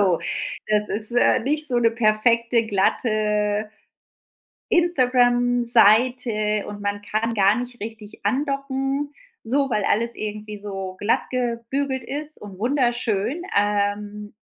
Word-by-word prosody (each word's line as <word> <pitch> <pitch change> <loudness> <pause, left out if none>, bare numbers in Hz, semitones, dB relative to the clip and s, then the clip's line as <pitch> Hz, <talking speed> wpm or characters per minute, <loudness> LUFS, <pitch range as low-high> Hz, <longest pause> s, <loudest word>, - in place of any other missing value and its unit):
So 185 -4 +3 0.5
das 210 0 +1
ist, 215 +3 -2
äh, 245 +1 +4
nicht 300 +5 +3
so 245 - 0
'ne 230 -1 +3
perfekte 230 +1 +2
glatte 210 0 0 1.0
Instagram-Seite 245 - +3
und 205 0 -7
man 205 0 -3
kann 220 +2 -2
gar 200 0 +4
nicht 245 -1 -6
richtig 215 -1 -9
andocken, 275 +3 -1 0.3
so 275 +4 +1
weil 210 - 0
alles 235 +3 +1
irgendwie 210 0 -6
so 195 -2 -6
glattgebügelt 250 +4 -1
ist 295 +4 -4
und 200 -2 -10
wunderschön 240 - 0 0.2
ähm, 205 0 -1
230 Hz, 110 wpm, -22 LUFS, 210-250 Hz, 1.0 s, äh